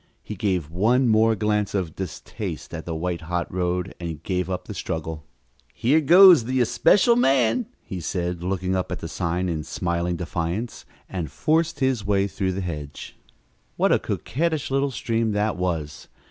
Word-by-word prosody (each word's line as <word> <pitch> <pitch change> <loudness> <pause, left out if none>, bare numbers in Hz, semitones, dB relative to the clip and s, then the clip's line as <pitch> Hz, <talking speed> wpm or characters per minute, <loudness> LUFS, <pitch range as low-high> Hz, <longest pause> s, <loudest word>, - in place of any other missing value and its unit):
He - - -6
gave 90 -6 -1
one 120 +9 +3
more 110 0 +4
glance 105 0 0
of 90 -5 -2
distaste 95 -2 -6
at 80 0 -6
the 85 - -3
white 85 +1 -2
hot 85 +2 -3
road 90 0 -1
and 85 -3 -6
gave 90 0 -1
up 90 -1 -3
the - - -7
struggle. 80 -1 -4 0.5
"Here 140 +7 +3
goes 175 -3 +8
the 130 +2 0
'especial 205 - +4
man,'" 135 - +2 0.2
he 95 - -6
said, 90 +1 -3
looking 95 0 -1
up 95 - -2
at - - -2
the - - -6
sign 90 +2 -2
in 80 -3 -2
smiling 85 +1 -2
defiance, 90 +6 -4 0.2
and 90 -5 -4
forced 160 -1 0
his 130 -5 +1
way 100 -1 +2
through 95 -1 -2
the 95 - -3
hedge. 75 -5 -6 0.6
What - - +3
a - - +4
coquettish 155 0 -2
little 135 +1 +1
stream 115 -3 -1
that 105 +1 0
was! 85 -5 -3
95 Hz, 170 wpm, -24 LUFS, 85-120 Hz, 0.6 s, goes